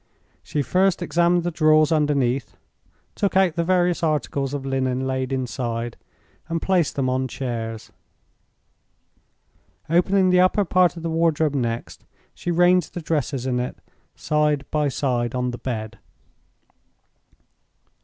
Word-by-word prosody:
She 145 - -2
first 185 +6 +1
examined 170 +2 +2
the 175 - -1
drawers 155 -1 +4
underneath, 140 -6 0 0.6
took 200 -2 0
out 190 -4 +4
the 170 - 0
various 180 0 +1
articles 145 -4 -1
of 140 -2 -4
linen 130 -1 -1
laid 130 0 -2
inside, 120 -3 -3 0.5
and 165 0 -1
placed 180 -3 +1
them 135 -2 0
on 130 +1 0
chairs. 115 -4 -5 2.0
Opening 185 +2 +3
the 180 - +4
upper 185 +2 +3
part 180 -1 +2
of 165 - -8
the 165 - -2
wardrobe 160 -2 +1
next, 120 -4 -3 0.3
she - - -6
ranged 175 0 +3
the 175 - -4
dresses 145 -4 -2
in 125 -1 0
it 125 - -4 0.4
side 150 -2 0
by 150 -2 +1
side 125 -3 -1
on 125 0 -1
the 120 - -7
bed. 115 -2 -5
150 Hz, 135 wpm, -23 LUFS, 130-175 Hz, 2.0 s, drawers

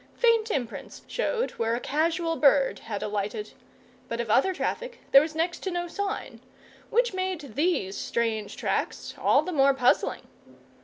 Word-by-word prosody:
Faint 460 -2 +3
imprints 250 - -4
showed - - -1
where 230 +1 +1
a - - -2
casual 330 +4 0
bird 280 -3 +4
had 205 -3 -5
alighted, 210 +1 -3 0.6
but 230 - -4
of 235 -3 -1
other 275 - +4
traffic 480 +6 -3
there 275 - +9
was 310 +1 -4
next 340 +2 -1
to 385 - -3
no 350 -1 -2
sign; 400 +3 -4 0.5
which 480 -1 +2
made 370 -9 -3
these 285 - 0
strange 220 -3 -2
tracks - - -2
all - - +3
the 365 - -4
more 275 -3 +4
puzzling. 250 -2 +2
305 Hz, 155 wpm, -27 LUFS, 235-370 Hz, 0.6 s, there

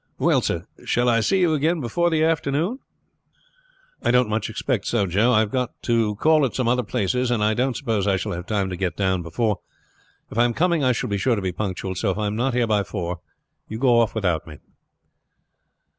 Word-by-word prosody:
Well, - - +2
sir, - - -2 0.2
shall 120 +1 +1
I 115 -1 +4
see 190 - +1
you 170 -3 +3
again 160 +3 +1
before 165 +7 0
the 160 -1 +1
afternoon?" 160 - 0 1.2
"I - - 0
don't 125 -2 +3
much 110 0 -1
expect 110 -1 -2
so, 115 -4 +1
Joe. 100 +7 +2
I 110 -3 +4
have 105 -2 -2
got 125 -2 -2
to 115 -3 +1
call 155 +6 +3
at 130 - -1
some 130 -3 0
other 125 +1 +2
places, 120 +3 -1
and 120 -3 +1
I 105 +1 +3
don't 125 +2 0
suppose 105 -3 -1
I 95 -1 +2
shall - - -4
have 90 +1 -5
time 100 -3 -1
to - - -3
get 90 0 -3
down 95 -2 +1
before. 105 +6 -1 0.7
If 115 - -3
I 120 - +5
am 120 - -1
coming 170 -3 +2
I 130 - +4
shall 115 - -2
be 100 - 0
sure 120 +3 +2
to 100 - -3
be 95 - -1
punctual; 95 0 -4
so 95 +3 -1
if 95 - -1
I 105 - -1
am 105 +1 -2
not 125 +2 0
here 125 -1 +2
by 105 -2 +2
four, 90 -3 -4 0.6
go 120 -1 +4
off 115 -1 +1
without 90 -8 -1
me." 75 -2 -10
115 Hz, 225 wpm, -23 LUFS, 100-130 Hz, 1.2 s, I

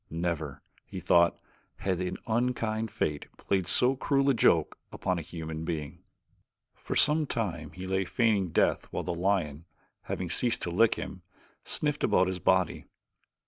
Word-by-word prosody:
Never, 80 -4 -3 0.2
he - - -7
thought, 85 -1 +4 0.4
had 95 -2 -2
an 90 0 -2
unkind 115 -1 0
fate 75 -8 -2
played 95 -3 -1
so 130 +2 +3
cruel 140 +1 +2
a - - +2
joke 85 -9 +3
upon 90 -1 -1
a - - -4
human 80 -1 -6
being. 80 -4 -4 0.7
For - - -6
some 150 +1 +3
time 85 - -3
he 95 0 -7
lay 95 +1 0
feigning 100 -2 +1
death - - +2
while - - -4
the 90 - -2
lion, 85 -4 0 0.4
having 90 -2 -3
ceased 120 +5 +1
to 85 - -2
lick 110 +6 +4
him, - - -6 0.4
sniffed 150 -1 -2
about 90 - +4
his 95 -1 -3
body. - - +1
95 Hz, 155 wpm, -29 LUFS, 85-115 Hz, 0.7 s, thought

